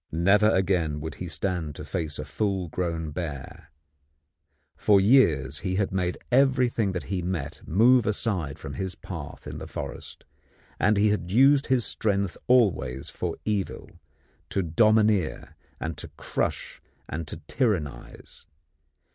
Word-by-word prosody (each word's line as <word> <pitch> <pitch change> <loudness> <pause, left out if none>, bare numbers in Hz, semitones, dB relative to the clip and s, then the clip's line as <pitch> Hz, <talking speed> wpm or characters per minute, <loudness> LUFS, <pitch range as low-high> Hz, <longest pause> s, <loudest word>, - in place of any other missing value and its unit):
Never 100 +6 +4
again 90 -7 +1
would 80 +1 -5
he 90 - -3
stand 85 -4 -2
to 75 - -8
face 80 -4 -2
a - - -5
full 95 -5 -2
grown 80 -2 -3
bear. 75 -5 -6 1.1
For 100 -2 +4
years 80 - +4
he 95 -2 -2
had 100 0 0
made 90 -1 -1
everything 125 -6 +3
that 90 - -3
he 95 -2 -3
met 85 -5 -4
move 115 +6 +4
aside 100 - -1
from 70 - -8
his 95 +5 -4
path - - -8
in - - -6
the - - -7
forest, - - -7 0.5
and 105 +1 +3
he 105 +1 +4
had 90 -4 -1
used 135 +7 +5
his 130 -3 +2
strength 100 -4 -1
always 75 - +2
for - - -4
evil, 105 -3 -2 0.6
to 95 - 0
domineer 105 - +2 0.2
and 80 0 -4
to - - -6
crush - - -3 0.3
and 80 +1 -5
to - - -6
tyrannize. 80 - -3
95 Hz, 140 wpm, -26 LUFS, 80-105 Hz, 1.1 s, used